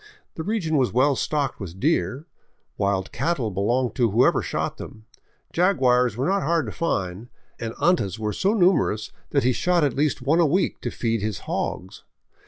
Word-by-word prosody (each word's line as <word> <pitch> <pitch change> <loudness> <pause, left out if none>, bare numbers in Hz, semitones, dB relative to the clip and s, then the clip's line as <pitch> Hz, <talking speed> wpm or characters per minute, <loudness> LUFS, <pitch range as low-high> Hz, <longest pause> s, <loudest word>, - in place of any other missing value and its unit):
The - - -6
region 175 -5 -1
was 130 -3 +2
well 135 +4 +3
stocked 145 +1 -1
with 95 -3 -8
deer; 145 0 0 0.5
wild 100 -1 -1
cattle 135 -10 -1
belonged 120 +6 0
to 120 -3 +3
whoever 115 +5 +3
shot - - -3
them; 110 0 -10 0.5
jaguars 125 - +3
were 130 - 0
not 195 +3 +1
hard 165 -2 +1
to 110 - -5
find 100 - -3 0.3
and 115 -1 -5
antas 140 - +1
were 105 -1 -2
so 200 +4 +1
numerous 170 - +2 0.2
that 140 - +1
he 130 - +3
shot 175 +6 +1
at 140 -4 +1
least 145 +1 0
one 155 +6 +2
a 170 - +5
week 180 +7 0
to - - -2
feed 115 -2 -1
his 105 -2 -3
hogs. 95 +1 -4
130 Hz, 180 wpm, -24 LUFS, 110-165 Hz, 0.5 s, a